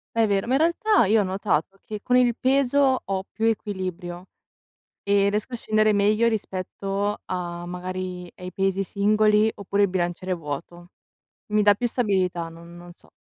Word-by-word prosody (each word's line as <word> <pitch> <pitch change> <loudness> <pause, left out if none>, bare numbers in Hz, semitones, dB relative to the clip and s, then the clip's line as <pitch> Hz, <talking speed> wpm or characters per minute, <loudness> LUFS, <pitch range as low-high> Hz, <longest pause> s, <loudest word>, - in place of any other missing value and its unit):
È 225 -1 +4
vero, 200 +1 0
ma 255 - 0
in 270 - +3
realtà 340 - +3
io 215 +2 +4
ho - - +1
notato 190 -1 -1
che 210 -1 -7
con 250 - +1
il 240 -2 +3
peso 270 0 +2
ho 190 -1 -2
più 225 - -2
equilibrio 185 -5 -3 0.8
e 200 0 +3
riesco 210 +4 -2
a - - -1
scendere 215 -1 +2
meglio 210 +3 +3
rispetto 200 0 -3
a, 175 -1 -4
magari, 180 0 -5
ai 180 0 -8
pesi 195 0 0
singoli 210 +2 +3
oppure 200 0 -1
al 200 - +4
bilanciere 180 0 -2
vuoto. 170 +3 -7 0.6
Mi 210 0 +3
dà 205 -1 +6
più 240 - -3
stabilità, 185 -8 0
non 170 +1 -12
non 175 0 -12
so. - - -20
200 Hz, 170 wpm, -24 LUFS, 180-215 Hz, 0.8 s, dà